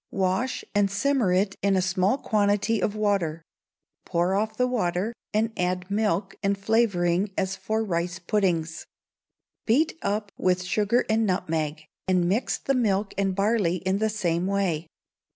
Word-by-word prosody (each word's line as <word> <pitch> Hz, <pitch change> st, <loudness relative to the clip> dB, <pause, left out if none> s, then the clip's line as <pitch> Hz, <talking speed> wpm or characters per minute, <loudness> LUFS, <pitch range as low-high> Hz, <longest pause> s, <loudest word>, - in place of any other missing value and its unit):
Wash, 190 Hz, +7 st, -1 dB
and 205 Hz, -1 st, +3 dB
simmer 230 Hz, +1 st, +1 dB
it 195 Hz, +2 st, +1 dB
in 200 Hz, 0 st, +2 dB
a -, -, +3 dB
small 190 Hz, +5 st, +1 dB
quantity 210 Hz, -2 st, +1 dB
of 205 Hz, -, 0 dB
water; 195 Hz, -7 st, 0 dB, 0.6 s
pour 175 Hz, +2 st, 0 dB
off 215 Hz, +2 st, -1 dB
the 250 Hz, -, +3 dB
water, 215 Hz, -3 st, -1 dB, 0.2 s
and 220 Hz, +1 st, 0 dB
add 180 Hz, +1 st, -2 dB
milk 200 Hz, -2 st, 0 dB
and 200 Hz, -1 st, +1 dB
flavouring 195 Hz, -3 st, +1 dB
as 190 Hz, -1 st, 0 dB
for 215 Hz, +4 st, -2 dB
rice 175 Hz, -3 st, -2 dB
puddings. 175 Hz, -5 st, -1 dB, 0.8 s
Beat 305 Hz, +8 st, +2 dB
up 205 Hz, 0 st, -2 dB
with 185 Hz, 0 st, +1 dB
sugar 210 Hz, +6 st, +1 dB
and 220 Hz, 0 st, +2 dB
nutmeg, 155 Hz, -4 st, -2 dB, 0.2 s
and 180 Hz, -2 st, +2 dB
mix 210 Hz, +8 st, 0 dB
the 275 Hz, -, -1 dB
milk 210 Hz, -5 st, +1 dB
and 195 Hz, -1 st, 0 dB
barley 200 Hz, -3 st, +2 dB
in 190 Hz, +2 st, -1 dB
the 220 Hz, 0 st, +1 dB
same 180 Hz, -4 st, -1 dB
way. 185 Hz, -5 st, 0 dB
195 Hz, 150 wpm, -26 LUFS, 180-215 Hz, 0.8 s, and